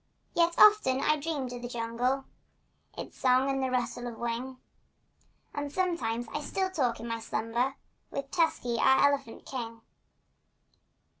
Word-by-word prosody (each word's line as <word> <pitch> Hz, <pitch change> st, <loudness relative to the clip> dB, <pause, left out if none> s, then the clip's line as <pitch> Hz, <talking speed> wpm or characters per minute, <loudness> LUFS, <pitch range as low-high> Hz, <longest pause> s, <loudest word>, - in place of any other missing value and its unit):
Yet 340 Hz, 0 st, +3 dB
often 420 Hz, -12 st, +6 dB
I 305 Hz, -, +3 dB
dreamed 285 Hz, -4 st, -3 dB
of 245 Hz, -, -6 dB
the 240 Hz, -, -4 dB
jungle— 245 Hz, +3 st, -1 dB, 0.7 s
Its -, -, -8 dB
song 260 Hz, +1 st, +4 dB
and 270 Hz, 0 st, -1 dB
the 260 Hz, -, 0 dB
rustle 245 Hz, -1 st, -1 dB
of 235 Hz, -2 st, -7 dB
wing— 240 Hz, +2 st, -3 dB, 1.0 s
And 290 Hz, -1 st, -3 dB
sometimes 290 Hz, -10 st, -1 dB, 0.2 s
still 380 Hz, +3 st, -1 dB
talked 255 Hz, -10 st, 0 dB
in 230 Hz, -, -6 dB
my 230 Hz, 0 st, -2 dB
slumber 235 Hz, +5 st, -1 dB, 0.3 s
With 275 Hz, 0 st, -5 dB
Tusky, 315 Hz, -9 st, +1 dB
our 265 Hz, +3 st, +6 dB
elephant 275 Hz, -5 st, -4 dB
king. 230 Hz, -3 st, -5 dB
260 Hz, 140 wpm, -30 LUFS, 235-285 Hz, 1.0 s, often